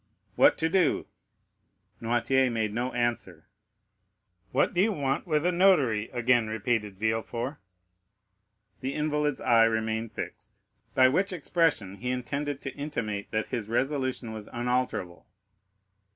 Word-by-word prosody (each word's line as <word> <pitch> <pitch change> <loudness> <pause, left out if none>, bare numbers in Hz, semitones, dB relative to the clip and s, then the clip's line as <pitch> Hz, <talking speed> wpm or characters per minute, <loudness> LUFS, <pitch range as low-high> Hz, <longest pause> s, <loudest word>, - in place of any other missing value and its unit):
"What - - +5
to 160 - +1
do?" 180 -1 +2 1.0
Noirtier 120 +3 +2
made 110 -2 -1
no 125 +3 -1
answer. 120 -1 -2 1.0
"What 130 - +2
do 175 - +3
you 220 +3 +3
want 140 -3 -1
with 155 -1 +1
a 180 - +3
notary?" 150 - +3
again 120 -2 +2
repeated 110 -2 -1
Villefort. 115 +5 -2 1.2
The 130 +1 -3
invalid's 150 -1 0
eye 115 -1 +5
remained 110 0 -1
fixed, - - -8 0.3
by 130 0 +7
which 185 +10 +1
expression 155 - 0
he 125 +5 -4
intended 140 +3 -3
to 135 - -5
intimate 115 -9 -4
that 110 0 -1
his 110 -4 -3
resolution 130 -2 -1
was 110 -1 -8
unalterable. 120 -7 -2
125 Hz, 125 wpm, -28 LUFS, 110-145 Hz, 1.2 s, by